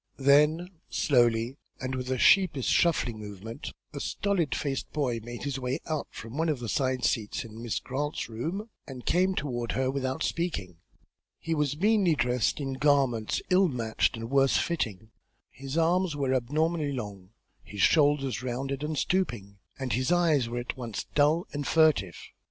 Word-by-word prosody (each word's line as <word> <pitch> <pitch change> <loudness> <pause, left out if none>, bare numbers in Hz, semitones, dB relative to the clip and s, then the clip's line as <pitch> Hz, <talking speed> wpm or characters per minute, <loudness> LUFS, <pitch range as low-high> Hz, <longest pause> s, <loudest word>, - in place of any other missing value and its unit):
Then, 150 +6 +4 0.2
slowly, 120 -1 +2 0.2
and 130 0 -3
with 125 0 -4
a 130 - 0
sheepish 160 -3 +4
shuffling 125 -10 +2
movement, 105 +2 -7 0.2
a - - -5
stolid 195 -7 -1
faced 135 -2 -3
boy 130 -6 -1
made 120 +2 -8
his 140 -2 -2
way 125 +1 -1
out 155 -3 -2
from 115 +7 -8
one 165 0 +1
of 150 - +1
the 120 -2 -5
side 130 0 0
seats 110 0 -1
in 110 0 -10
Miss 120 -2 -2
Grant's 145 +3 -3
room, 170 - -4 0.2
and 130 -3 -9
came 185 +2 +2
toward 120 -6 -2
her 130 +1 0
without 130 -1 -2
speaking. 100 - -2 0.6
He 165 - -3
was 150 -2 0
meanly 200 -3 +3
dressed 125 -1 +1
in 135 -2 -3
garments 135 -7 +2
ill 185 +1 +5
matched 120 -7 0
and 115 +2 -6
worse 135 -1 +4
fitting; 110 - -2 0.4
his 135 +3 -6
arms 170 0 +2
were 135 -2 0
abnormally 150 +4 0
long, 100 -7 -6 0.3
his 100 -2 -6
shoulders 145 -6 +3
rounded 135 +2 -3
and 155 0 -2
stooping, 120 - -1 0.2
and 130 -2 -2
his 130 +4 0
eyes 160 -8 +3
were 120 - -4
at 120 0 -4
once 120 -5 -5
dull 150 +4 +3
and 145 -1 -3
furtive. 155 - +3
135 Hz, 165 wpm, -28 LUFS, 120-155 Hz, 0.6 s, ill